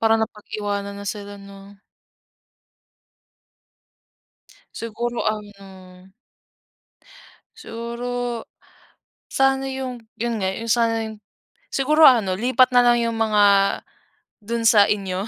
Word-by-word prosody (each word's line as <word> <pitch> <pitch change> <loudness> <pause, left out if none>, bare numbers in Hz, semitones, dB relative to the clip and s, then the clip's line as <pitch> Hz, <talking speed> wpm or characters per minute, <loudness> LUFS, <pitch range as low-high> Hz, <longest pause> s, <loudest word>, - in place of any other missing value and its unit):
parang 225 0 +3
napag-iwanan 205 -2 -4
na 200 0 -8
sila, 205 0 -6
'no? 200 0 -14 2.9
Siguro 235 +1 -4
ano 195 -3 -7 1.5
siguro 235 +1 -5 0.8
sana 270 0 +1
yung, 260 -2 -5 0.2
'yon 230 -1 -2
nga, 190 - 0
yung 230 -1 -1
sana 230 -1 +1
yung 220 -1 -9 0.5
siguro 305 +4 +2
ano, 225 -10 +6
lipat 255 +5 +3
na 245 - +7
lang 240 0 +4
yung 230 -1 -1
mga, 215 -2 +2 1.0
do'n 230 +2 -4
sa 210 -3 +6
inyo 195 -1 -2
225 Hz, 100 wpm, -22 LUFS, 200-240 Hz, 2.9 s, na